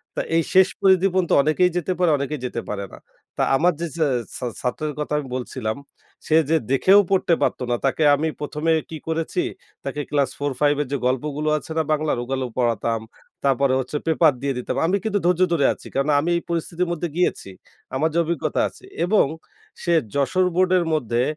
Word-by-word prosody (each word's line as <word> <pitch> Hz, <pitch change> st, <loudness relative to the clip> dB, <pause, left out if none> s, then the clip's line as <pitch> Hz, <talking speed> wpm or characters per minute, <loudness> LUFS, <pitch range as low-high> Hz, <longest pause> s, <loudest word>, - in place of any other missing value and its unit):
তো -, -, -2 dB, 0.2 s
এই 165 Hz, -, +3 dB
শেষ 190 Hz, 0 st, +7 dB
পরিধি 190 Hz, 0 st, +5 dB
পর্যন্ত 185 Hz, -2 st, +1 dB
অনেকেই 155 Hz, +5 st, +3 dB
যেতে 175 Hz, +1 st, -1 dB
পারে, 175 Hz, -3 st, +3 dB
অনেকেই 140 Hz, +1 st, -3 dB
যেতে 120 Hz, -1 st, -3 dB
পারে 100 Hz, -1 st, -3 dB
না। -, -, -9 dB, 0.4 s
তা -, -, 0 dB
আমার 175 Hz, +5 st, +3 dB
যে 170 Hz, -, -2 dB
ছা 160 Hz, -, +2 dB, 0.3 s
ছা 125 Hz, -, -5 dB, 0.2 s
ছাত্রের 150 Hz, +4 st, -2 dB
কথা 150 Hz, -, -4 dB
আমি 145 Hz, -, -6 dB
বলছিলাম, 120 Hz, -3 st, -3 dB, 0.5 s
সে 155 Hz, -, +3 dB
যে 165 Hz, -, +4 dB
দেখেও 190 Hz, +9 st, +6 dB
পড়তে 190 Hz, -2 st, +2 dB
পারত -, -, +1 dB
না। 120 Hz, -, +2 dB
তাকে 145 Hz, +3 st, +1 dB
আমি 155 Hz, +3 st, -1 dB
১ম 150 Hz, +1 st, -5 dB
এ -, -, +4 dB
কি 160 Hz, -, -6 dB
করেছি, 165 Hz, +2 st, -1 dB, 0.4 s
তাকে 140 Hz, +2 st, -3 dB
ক্লাস 140 Hz, -3 st, +1 dB
4/5 145 Hz, +1 st, +1 dB
এর 145 Hz, -, -3 dB
যে 140 Hz, -, 0 dB
গল্পগুলো 145 Hz, +4 st, -1 dB
আছে 155 Hz, -, -9 dB
না 160 Hz, -, +3 dB
বাংলার? 155 Hz, -3 st, +1 dB
ওগুলো 130 Hz, +1 st, -2 dB
পড়াতাম। 115 Hz, -2 st, 0 dB, 0.4 s
তারপরে 135 Hz, -1 st, +2 dB
হচ্ছে 130 Hz, +3 st, -3 dB
পেপার 160 Hz, -2 st, +4 dB
দিয়ে 140 Hz, 0 st, -1 dB
দিতাম। 125 Hz, -, -3 dB
আমি 195 Hz, +4 st, +2 dB
কিন্তু 210 Hz, -2 st, 0 dB
ধৈর্য 180 Hz, 0 st, +2 dB
ধরে 145 Hz, -5 st, +2 dB
আছি। -, -, -13 dB
কারণ 140 Hz, +2 st, +1 dB
আমি 160 Hz, +4 st, -1 dB
এই -, -, -3 dB
পরিস্থিতির 170 Hz, +1 st, -2 dB
মধ্যে 175 Hz, 0 st, -2 dB
গিয়েছি। 175 Hz, -, 0 dB, 0.5 s
আমার 155 Hz, +4 st, +1 dB
যে -, -, -1 dB
অভিজ্ঞতা 170 Hz, +1 st, -1 dB
আছে -, -, -19 dB, 0.2 s
এবং 205 Hz, -1 st, +4 dB, 0.6 s
সে 175 Hz, -, 0 dB, 0.2 s
যশোর 140 Hz, +7 st, +2 dB
বোর্ডের 185 Hz, -1 st, +3 dB
মধ্যে 120 Hz, -5 st, 0 dB
150 Hz, 195 wpm, -22 LUFS, 135-175 Hz, 0.6 s, শেষ